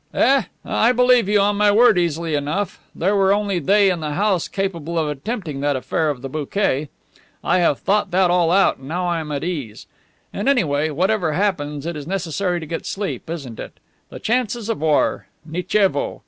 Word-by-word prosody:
"Eh, -, -, -3 dB, 0.2 s
eh, -, -, -4 dB, 0.2 s
I 230 Hz, -, +2 dB
believe 250 Hz, -4 st, +4 dB
you, 210 Hz, 0 st, +4 dB
on 205 Hz, +1 st, +1 dB
my 205 Hz, 0 st, +4 dB
word, 225 Hz, +1 st, +5 dB
easily 170 Hz, -2 st, -1 dB
enough. 150 Hz, +7 st, -2 dB, 0.2 s
There 195 Hz, +5 st, +1 dB
were 195 Hz, -1 st, +3 dB
only 200 Hz, -2 st, +1 dB
they 195 Hz, +4 st, +3 dB
in 175 Hz, -, -2 dB
the 150 Hz, -2 st, -3 dB
house 200 Hz, -3 st, +1 dB
capable 170 Hz, -4 st, -3 dB
of 160 Hz, -2 st, +1 dB
attempting 155 Hz, -, -4 dB
that 145 Hz, 0 st, 0 dB
affair 150 Hz, +4 st, -1 dB
of 135 Hz, -3 st, -4 dB
the -, -, -3 dB
bouquet. 150 Hz, 0 st, -1 dB, 0.5 s
I 185 Hz, -, +2 dB
have 165 Hz, -5 st, +2 dB
thought 205 Hz, +2 st, 0 dB
that 180 Hz, 0 st, +2 dB
all 175 Hz, -2 st, +3 dB
out, 195 Hz, +3 st, +3 dB
and 135 Hz, -, -13 dB
now 180 Hz, +4 st, -2 dB
I 170 Hz, -1 st, 0 dB
am 155 Hz, -2 st, -6 dB
at 140 Hz, -1 st, -3 dB
ease. 145 Hz, -11 st, -5 dB, 0.5 s
And 205 Hz, +7 st, -1 dB
anyway, 155 Hz, -, +1 dB
whatever 180 Hz, +1 st, 0 dB
happens, 150 Hz, -6 st, -1 dB
it 170 Hz, 0 st, -3 dB
is 145 Hz, -1 st, -7 dB
necessary 180 Hz, 0 st, -2 dB
to 160 Hz, -, -7 dB
get 165 Hz, +2 st, -5 dB
sleep, 195 Hz, -4 st, -4 dB
isn't 140 Hz, -9 st, -6 dB
it? -, -, -9 dB, 0.3 s
The -, -, -9 dB
chances 235 Hz, -1 st, -1 dB
of 225 Hz, -, -2 dB
war! 155 Hz, -2 st, +1 dB, 0.2 s
Nichevo!" 195 Hz, -, 0 dB
175 Hz, 200 wpm, -20 LUFS, 150-205 Hz, 0.5 s, word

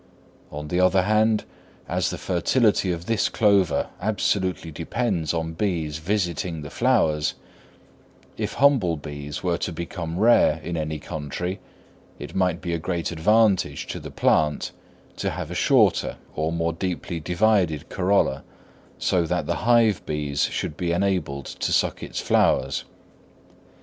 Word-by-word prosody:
On 75 Hz, 0 st, -6 dB
the 90 Hz, -, 0 dB
other 90 Hz, 0 st, +4 dB
hand, 110 Hz, +2 st, +2 dB, 0.4 s
as -, -, 0 dB
the -, -, -4 dB
fertility 100 Hz, +2 st, +2 dB
of 85 Hz, 0 st, -4 dB
this 115 Hz, +1 st, +1 dB
clover 100 Hz, -4 st, +2 dB
absolutely 95 Hz, -4 st, 0 dB
depends 80 Hz, 0 st, -1 dB
on 80 Hz, -1 st, -2 dB
bees 80 Hz, -5 st, -2 dB
visiting 85 Hz, -3 st, -2 dB
the 70 Hz, -, -8 dB
flowers, 95 Hz, -12 st, +2 dB, 1.0 s
if -, -, -3 dB
humble 120 Hz, -, +3 dB
bees 75 Hz, 0 st, -7 dB
were 90 Hz, -1 st, 0 dB
to -, -, -2 dB
become 85 Hz, 0 st, -5 dB
rare 105 Hz, -7 st, +4 dB
in 85 Hz, -, -4 dB
any 80 Hz, -1 st, -2 dB
country, 80 Hz, +5 st, -5 dB, 0.6 s
it -, -, -8 dB
might 90 Hz, -2 st, 0 dB
be 85 Hz, -2 st, -3 dB
a 85 Hz, -, -1 dB
great 85 Hz, +1 st, -2 dB
advantage 95 Hz, -3 st, +2 dB
to -, -, -4 dB
the -, -, -8 dB
plant 75 Hz, -1 st, +1 dB, 0.5 s
to -, -, -1 dB
have 85 Hz, 0 st, -5 dB
a -, -, -3 dB
shorter 105 Hz, +1 st, +3 dB, 0.2 s
or 80 Hz, +1 st, -1 dB
more 85 Hz, 0 st, -1 dB
deeply 90 Hz, 0 st, -3 dB
divided 90 Hz, -2 st, +1 dB
corolla, 95 Hz, -8 st, +1 dB, 0.5 s
so 85 Hz, -3 st, +1 dB
that -, -, -1 dB
the -, -, -1 dB
hive 115 Hz, -5 st, +4 dB
bees 75 Hz, -2 st, 0 dB
should 75 Hz, -, -3 dB
be 85 Hz, +2 st, -2 dB
enabled 90 Hz, -7 st, -1 dB
to -, -, -3 dB
suck -, -, +1 dB
its -, -, -5 dB
flowers. 65 Hz, +1 st, +2 dB
85 Hz, 145 wpm, -24 LUFS, 80-100 Hz, 1.0 s, other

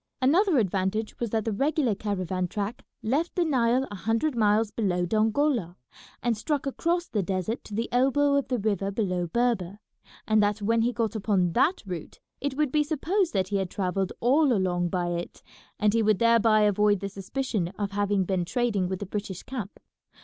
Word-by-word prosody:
Another 325 Hz, +6 st, +3 dB
advantage 200 Hz, 0 st, -1 dB
was 235 Hz, -, -2 dB
that 220 Hz, 0 st, -1 dB
the 225 Hz, -, 0 dB
regular 275 Hz, +2 st, +1 dB
caravan 185 Hz, -3 st, -2 dB
track 205 Hz, +4 st, -4 dB, 0.2 s
left 285 Hz, +10 st, 0 dB
the 350 Hz, -, +2 dB
Nile 255 Hz, -2 st, +2 dB
a -, -, -5 dB
hundred 225 Hz, +9 st, 0 dB
miles 215 Hz, -1 st, +2 dB
below 180 Hz, -5 st, 0 dB
Dongola, 220 Hz, -, +1 dB, 0.5 s
and 235 Hz, -1 st, +1 dB
struck 285 Hz, +7 st, -2 dB
across 340 Hz, +5 st, -1 dB
the 210 Hz, -, -1 dB
desert 190 Hz, +5 st, -2 dB
to 210 Hz, -, -7 dB
the 230 Hz, +2 st, -1 dB
elbow 275 Hz, +3 st, +3 dB
of 280 Hz, -1 st, +1 dB
the 250 Hz, -, 0 dB
river 200 Hz, -2 st, -1 dB
below 185 Hz, -4 st, -1 dB
Berber, 210 Hz, -3 st, 0 dB, 0.5 s
and 215 Hz, 0 st, +4 dB
that 205 Hz, +1 st, +1 dB
when 225 Hz, +2 st, +1 dB
he 240 Hz, +2 st, +2 dB
got 230 Hz, -3 st, -2 dB
upon 195 Hz, -4 st, +1 dB
that 345 Hz, +9 st, +2 dB
route 180 Hz, -5 st, -7 dB, 0.2 s
it 280 Hz, -1 st, -3 dB
would 300 Hz, -3 st, +1 dB
be 300 Hz, +1 st, +3 dB
supposed 335 Hz, +5 st, 0 dB
that 190 Hz, -1 st, 0 dB
he 205 Hz, -, 0 dB
had 190 Hz, -2 st, -2 dB
travelled 190 Hz, 0 st, -1 dB
all 275 Hz, +4 st, +4 dB
along 180 Hz, -5 st, +1 dB
by 175 Hz, -1 st, -1 dB
it, 175 Hz, 0 st, -5 dB, 0.4 s
and 210 Hz, 0 st, +3 dB
he 230 Hz, -, +3 dB
would 215 Hz, -2 st, +3 dB
thereby 230 Hz, -1 st, +4 dB
avoid 210 Hz, -1 st, +3 dB
the 200 Hz, -, -3 dB
suspicion 200 Hz, 0 st, -3 dB
of 200 Hz, -1 st, -2 dB
having 205 Hz, -1 st, +1 dB
been 185 Hz, -1 st, -1 dB
trading 205 Hz, -1 st, 0 dB
with 190 Hz, 0 st, -4 dB
the -, -, -3 dB
British 195 Hz, -2 st, -5 dB
camp. 225 Hz, -7 st, -6 dB
215 Hz, 190 wpm, -27 LUFS, 195-250 Hz, 0.5 s, and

